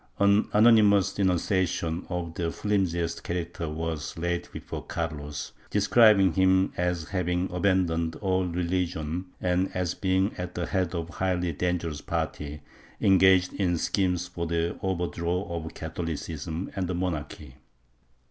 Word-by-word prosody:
An 100 Hz, +1 st, +4 dB
anonymous 105 Hz, -3 st, +5 dB
denunciation 90 Hz, -2 st, 0 dB
of 85 Hz, -2 st, -3 dB
the 85 Hz, 0 st, -2 dB
flimsiest 85 Hz, -4 st, -1 dB
character 85 Hz, -2 st, -3 dB
was 80 Hz, -1 st, -4 dB
laid 85 Hz, +1 st, -2 dB
before -, -, -6 dB
Carlos, 75 Hz, -3 st, -4 dB, 0.2 s
describing 105 Hz, -2 st, +5 dB
him 95 Hz, 0 st, +3 dB
as 90 Hz, -2 st, -1 dB
having 90 Hz, -1 st, 0 dB
aban 95 Hz, +1 st, +2 dB
doned 80 Hz, -1 st, -2 dB
all 95 Hz, -2 st, +1 dB
religion 90 Hz, -1 st, -2 dB
and 90 Hz, +1 st, +1 dB
as 90 Hz, -1 st, 0 dB
being 95 Hz, +1 st, +1 dB
at 90 Hz, 0 st, -5 dB
the 85 Hz, -, -1 dB
head 95 Hz, 0 st, -1 dB
of 85 Hz, -1 st, -3 dB
a -, -, -12 dB
highly 90 Hz, -2 st, 0 dB
dangerous 85 Hz, -1 st, -2 dB
party, 75 Hz, 0 st, -4 dB, 0.4 s
engaged 95 Hz, -1 st, +5 dB
in 90 Hz, -3 st, 0 dB
schemes 90 Hz, 0 st, 0 dB
for 85 Hz, -1 st, -4 dB
the 85 Hz, +1 st, 0 dB
overthrow 90 Hz, -1 st, -1 dB
of 85 Hz, -3 st, -5 dB
Catholicism 80 Hz, +1 st, -4 dB
and 95 Hz, -2 st, -1 dB
the 90 Hz, -, -2 dB
monarchy. 75 Hz, -6 st, -4 dB
90 Hz, 135 wpm, -27 LUFS, 85-95 Hz, 0.4 s, anonymous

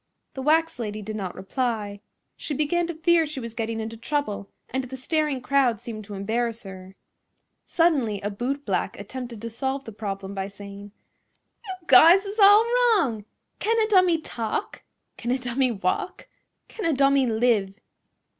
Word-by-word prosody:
The 265 Hz, -, -6 dB
wax 320 Hz, +1 st, +2 dB
lady 210 Hz, -2 st, -4 dB
did 215 Hz, +1 st, -5 dB
not 190 Hz, -4 st, -4 dB
reply. 205 Hz, 0 st, -3 dB, 0.3 s
She 295 Hz, -, -4 dB
began 335 Hz, +4 st, 0 dB
to 340 Hz, -, -5 dB
fear 330 Hz, 0 st, +3 dB
she 295 Hz, -2 st, -6 dB
was 230 Hz, -2 st, -7 dB
getting 225 Hz, 0 st, -3 dB
into 225 Hz, +1 st, -5 dB
trouble, 225 Hz, -6 st, -3 dB, 0.2 s
and 260 Hz, 0 st, -2 dB
the 265 Hz, +1 st, -8 dB
staring 300 Hz, 0 st, -1 dB
crowd 255 Hz, -4 st, +2 dB
seemed 215 Hz, -2 st, -7 dB
to 205 Hz, 0 st, -8 dB
embarrass 230 Hz, +3 st, -2 dB
her. 190 Hz, -1 st, -10 dB, 0.7 s
Suddenly 280 Hz, -, +2 dB
a 205 Hz, -, -3 dB
bootblack 270 Hz, +7 st, -2 dB
attempted 240 Hz, -4 st, -7 dB
to 230 Hz, -, -3 dB
solve 265 Hz, +4 st, -2 dB
the 225 Hz, -, -7 dB
problem 200 Hz, -2 st, -5 dB
by 195 Hz, -1 st, -3 dB
saying: 200 Hz, 0 st, -10 dB, 0.8 s
"You 380 Hz, -, -3 dB
guys 335 Hz, +8 st, +7 dB
is 405 Hz, +3 st, -6 dB
all 410 Hz, +2 st, +8 dB
wrong! 440 Hz, -, +2 dB, 0.3 s
Can 455 Hz, +2 st, +1 dB
a 435 Hz, -, +3 dB
dummy 365 Hz, -5 st, +4 dB
talk? 230 Hz, -7 st, -4 dB, 0.4 s
Can 235 Hz, -, -5 dB
a 255 Hz, -, +2 dB
dummy 255 Hz, +1 st, 0 dB
walk? 195 Hz, -, -2 dB, 0.4 s
Can 435 Hz, -, -8 dB
a 330 Hz, -, +2 dB
dummy 275 Hz, -1 st, +3 dB
live?" 220 Hz, -4 st, +1 dB
245 Hz, 165 wpm, -25 LUFS, 210-305 Hz, 0.8 s, all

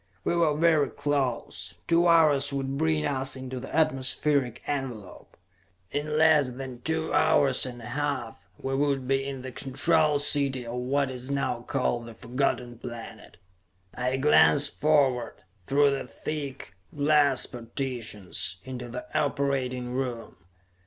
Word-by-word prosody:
We -, -, 0 dB
were 160 Hz, -4 st, +2 dB
very 160 Hz, -3 st, +3 dB
close; 140 Hz, -4 st, -2 dB
two 170 Hz, +1 st, +4 dB
hours 150 Hz, -4 st, +4 dB
would 135 Hz, -1 st, -2 dB
bring 155 Hz, +1 st, +1 dB
us 135 Hz, -1 st, 0 dB
into 130 Hz, -1 st, -6 dB
the 135 Hz, -, -7 dB
atmospheric 135 Hz, -4 st, +1 dB
envelope. 130 Hz, -8 st, -5 dB, 0.5 s
In 150 Hz, +1 st, -2 dB
less 155 Hz, -4 st, +5 dB
than 125 Hz, -1 st, -8 dB
two 160 Hz, +2 st, -2 dB
hours 135 Hz, -2 st, +3 dB
and 120 Hz, -1 st, -8 dB
a -, -, -7 dB
half, 140 Hz, -5 st, -3 dB, 0.2 s
we 135 Hz, -, -4 dB
would 135 Hz, -2 st, 0 dB
be 135 Hz, 0 st, +1 dB
in 135 Hz, -2 st, -5 dB
the 130 Hz, -, -6 dB
Control 150 Hz, +4 st, +1 dB
City 140 Hz, -3 st, 0 dB
of 115 Hz, -, -6 dB
what 135 Hz, +2 st, 0 dB
is 125 Hz, +1 st, -7 dB
now 140 Hz, -4 st, -1 dB
called 120 Hz, -2 st, -1 dB
the 115 Hz, -, -10 dB
Forgotten 120 Hz, -1 st, -2 dB
Planet! 120 Hz, -2 st, -9 dB, 0.6 s
I 125 Hz, +1 st, -1 dB
glanced 145 Hz, +1 st, +4 dB
forward, 135 Hz, -8 st, +2 dB, 0.2 s
through 145 Hz, +1 st, +4 dB
the 135 Hz, -2 st, -3 dB
thick 140 Hz, +3 st, -6 dB, 0.2 s
glass 145 Hz, -2 st, +4 dB
partitions, 115 Hz, -7 st, -4 dB
into 125 Hz, -2 st, -6 dB
the 125 Hz, +1 st, -6 dB
operating 130 Hz, -3 st, -1 dB
room. 125 Hz, -3 st, -4 dB
135 Hz, 140 wpm, -27 LUFS, 125-145 Hz, 0.6 s, less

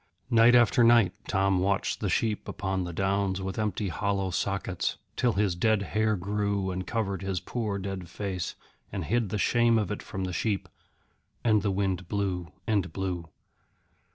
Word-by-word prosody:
Night 115 Hz, +1 st, +7 dB
after 120 Hz, 0 st, +5 dB
night 115 Hz, -5 st, +6 dB
Tom 95 Hz, -1 st, +2 dB
watched 100 Hz, +1 st, 0 dB
the -, -, -1 dB
sheep 110 Hz, -2 st, 0 dB
upon 95 Hz, -2 st, -2 dB
the 85 Hz, -, -4 dB
downs 95 Hz, +1 st, 0 dB
with 95 Hz, +1 st, -4 dB
empty 105 Hz, -1 st, -1 dB
hollow 95 Hz, +1 st, -1 dB
sockets, 95 Hz, 0 st, -1 dB, 0.2 s
till 120 Hz, -3 st, +2 dB
his 100 Hz, -2 st, +1 dB
dead 100 Hz, +3 st, +2 dB
hair 110 Hz, +1 st, +1 dB
grew 100 Hz, 0 st, -1 dB
and 95 Hz, 0 st, -4 dB
covered 100 Hz, -4 st, -1 dB
his 95 Hz, -2 st, -2 dB
poor 110 Hz, -2 st, -3 dB
dead 95 Hz, -3 st, -5 dB
face, 90 Hz, -2 st, -4 dB, 0.4 s
and 95 Hz, -4 st, -3 dB
hid 115 Hz, +4 st, +1 dB
the 105 Hz, -, -1 dB
shame 120 Hz, +2 st, +3 dB
of 105 Hz, -3 st, 0 dB
it 105 Hz, -, -3 dB
from 95 Hz, -, -5 dB
the 90 Hz, -1 st, -3 dB
sheep. 100 Hz, +1 st, -1 dB, 0.8 s
And 110 Hz, -3 st, +4 dB
the 100 Hz, -, 0 dB
wind 95 Hz, -2 st, -1 dB
blew 95 Hz, -5 st, -2 dB
and 100 Hz, -6 st, 0 dB
blew. 90 Hz, -3 st, -3 dB
100 Hz, 170 wpm, -28 LUFS, 95-105 Hz, 0.8 s, Night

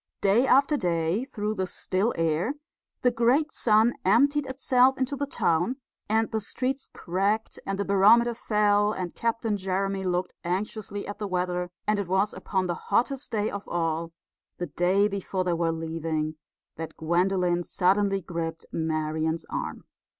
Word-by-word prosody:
Day 210 Hz, +6 st, +4 dB
after 280 Hz, +3 st, +4 dB
day, 175 Hz, -, 0 dB
through 215 Hz, -5 st, -3 dB
the 190 Hz, -3 st, -2 dB
still 190 Hz, +5 st, 0 dB
air, 165 Hz, -, 0 dB, 0.5 s
the 250 Hz, -, +4 dB
great 245 Hz, +7 st, +2 dB
sun 220 Hz, +1 st, +3 dB
emptied 275 Hz, +8 st, +3 dB
itself 260 Hz, 0 st, +3 dB
into 260 Hz, +2 st, -1 dB
the 285 Hz, +1 st, -2 dB
town; 175 Hz, -2 st, +1 dB, 0.3 s
and 220 Hz, +1 st, +1 dB
the 220 Hz, -, 0 dB
streets 260 Hz, +6 st, -3 dB
cracked, 200 Hz, +5 st, -1 dB
and 195 Hz, 0 st, -1 dB
the 200 Hz, -, -1 dB
barometer 220 Hz, +5 st, +5 dB
fell, 210 Hz, -2 st, +2 dB
and 180 Hz, -3 st, -4 dB
Captain 230 Hz, -2 st, -1 dB
Jeremy 195 Hz, 0 st, -1 dB
looked 180 Hz, 0 st, -1 dB
anxiously 200 Hz, +3 st, -3 dB
at 205 Hz, -, -7 dB
the 210 Hz, -, -2 dB
weather; 180 Hz, -1 st, -1 dB, 0.2 s
and 210 Hz, -1 st, +1 dB
it 200 Hz, -, -2 dB
was 190 Hz, +3 st, +1 dB
upon 190 Hz, -2 st, -2 dB
the 175 Hz, -, -1 dB, 0.2 s
hottest 270 Hz, +3 st, +1 dB
day 215 Hz, -1 st, 0 dB
of 200 Hz, 0 st, -6 dB
all 165 Hz, -1 st, -1 dB, 0.5 s
the 175 Hz, -, -2 dB
day 180 Hz, +6 st, +2 dB
before 195 Hz, -2 st, -2 dB
they 180 Hz, -1 st, 0 dB
were 170 Hz, -1 st, +1 dB
leaving 160 Hz, -1 st, -3 dB, 0.4 s
that 160 Hz, 0 st, -7 dB
Gwendolen 175 Hz, +2 st, +1 dB
suddenly 195 Hz, +3 st, +1 dB
gripped 165 Hz, -2 st, -4 dB
Marian's 160 Hz, 0 st, -1 dB
arm. -, -, -4 dB
195 Hz, 155 wpm, -27 LUFS, 175-225 Hz, 0.5 s, barometer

